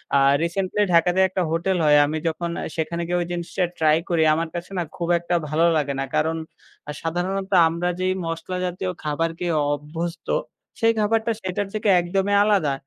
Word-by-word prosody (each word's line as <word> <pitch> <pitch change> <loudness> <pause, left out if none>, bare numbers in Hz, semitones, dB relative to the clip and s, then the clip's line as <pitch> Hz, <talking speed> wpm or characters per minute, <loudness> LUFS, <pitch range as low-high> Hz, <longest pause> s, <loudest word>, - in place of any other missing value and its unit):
আ - - +6 0.3
recently 190 +4 -1
ঢাকাতে 175 +2 +4
একটা 185 0 -2
hotel 180 +3 0
হয়। 150 0 +6
আমি 155 +2 -2
যখন 170 +1 -2
আ - - -3
সেখানে 170 +1 -2
গিয়ে 175 0 0
ওই 170 - -3
জিনিসটা 175 +2 -2 0.2
ট্রাই 155 0 +4
করি 165 -2 +2
আমার 165 +1 -1
কাছে 175 +3 -6
না 175 - 0
খুব 170 -1 -3
একটা 175 +1 -1
ভালো 160 +2 +2
লাগে 140 -2 -1
না। - - 0
কারণ 160 +1 +1 0.5
আ - - -2
সাধারণ 175 +3 -2 0.4
আমরা 170 +2 -2
যেই 185 0 +1
মশলা 165 +2 -4
জাতীয় 180 +1 -3
খাবার 155 +2 0
খেয়ে 175 -3 -1 0.2
অভ্যস্ত 165 +4 -5 0.5
সেই 225 0 +4
খাবারটা 225 +2 +1
সেটার 190 +2 -2
থেকে 215 0 0
একদমই 195 +3 0
আলাদা। 195 -10 +2
175 Hz, 180 wpm, -23 LUFS, 160-185 Hz, 0.5 s, আ